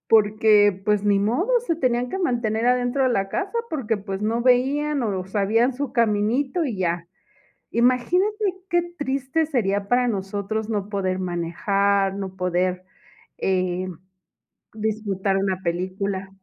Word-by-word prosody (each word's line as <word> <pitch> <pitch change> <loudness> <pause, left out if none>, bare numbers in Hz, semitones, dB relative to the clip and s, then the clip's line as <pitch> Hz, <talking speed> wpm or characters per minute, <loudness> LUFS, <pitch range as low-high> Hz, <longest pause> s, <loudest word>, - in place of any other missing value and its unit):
Porque 210 -1 +5
pues, 210 -1 +2
ni 205 -1 +3
modo 245 - 0 0.2
se 335 - +1
tenían 250 -4 0
que 380 - -4
mantener 235 - 0
adentro 250 +2 +2
de 260 - +3
la 195 -5 0
casa, 390 - -2
porque 240 -9 -1
pues 195 0 -5
no 225 +2 0
veían 270 +3 +2
o 190 -4 -2
sabían 215 +6 +2
su 280 -1 -4
caminito 235 - +1
y 230 -9 -3
ya. 170 -1 -1 0.6
Imagínate 360 - +2 0.2
que 345 -1 +2 0.2
triste 275 +3 -1
sería 200 -8 0
para 245 +1 +2
nosotros 205 +1 -3
no 205 -3 -2
poder 190 -3 -1
manejar, 195 +3 0
no 195 -1 -5
poder, 180 0 -1 0.6
eh, 185 -1 0 0.9
disfrutar 205 -3 -1
una 190 -1 0
película. 190 +2 -2
215 Hz, 135 wpm, -23 LUFS, 195-250 Hz, 0.9 s, Porque